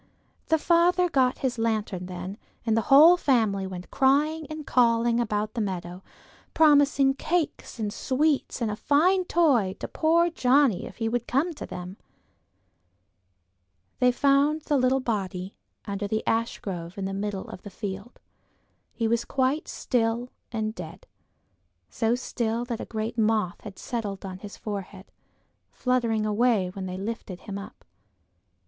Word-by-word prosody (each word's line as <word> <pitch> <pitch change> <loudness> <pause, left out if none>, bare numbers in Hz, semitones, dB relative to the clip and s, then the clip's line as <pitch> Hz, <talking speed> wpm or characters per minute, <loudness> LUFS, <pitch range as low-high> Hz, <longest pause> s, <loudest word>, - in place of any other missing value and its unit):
The 320 - +3
father 350 +2 +3
got 260 -6 +2
his 245 -2 -1
lantern 215 -5 -1
then, 185 +3 -7 0.3
and 225 -2 +2
the 225 - +3
whole 310 +6 +8
family 220 - +1
went 180 -1 -8
crying 295 +3 +2
and 310 -1 -6
calling 235 -1 +3
about 215 -2 -1
the 235 - -2
meadow, 180 -2 -4 0.5
promising 285 -3 +5
cakes 320 -1 -2
and 210 -2 -3
sweets 280 0 0
and 225 -2 0
a - - -3
fine 360 - +3
toy 260 - +2
to - - -4
poor 335 +2 +2
Johnnie 260 - +3
if - - -12
he 225 - -1
would 240 +1 -2
come 300 +8 +1
to - - -8
them. 180 +2 -7 2.0
They 250 0 +5
found 280 +4 +2
the 295 - 0
little 260 0 +2
body, 195 -5 -3 0.3
under 200 0 -3
the 220 +2 -1
ashgrove 195 -5 -2
in 195 - -3
the 195 - -3
middle 200 -1 -3
of - - -9
the 205 - -9
field. 200 +3 -7 0.7
He 230 - -1
was 235 +1 +1
quite 270 +3 0
still 235 0 -1 0.2
and 220 -2 -2
dead, 175 -6 -9 0.9
so 225 - +1
still 235 -2 -2
that 235 -2 -4
a - - -5
great 220 +1 -4
moth 215 -5 +1
had 205 -3 -10
settled 205 -5 -4
on 185 -1 -7
his 205 0 -10
forehead, 200 -2 -7 0.6
fluttering 235 -4 0
away 215 -3 +2
when 190 -1 -5
they 185 0 -5
lifted 195 -3 -6
him 200 -2 -6
up. 200 - -12
230 Hz, 150 wpm, -26 LUFS, 200-270 Hz, 2.0 s, whole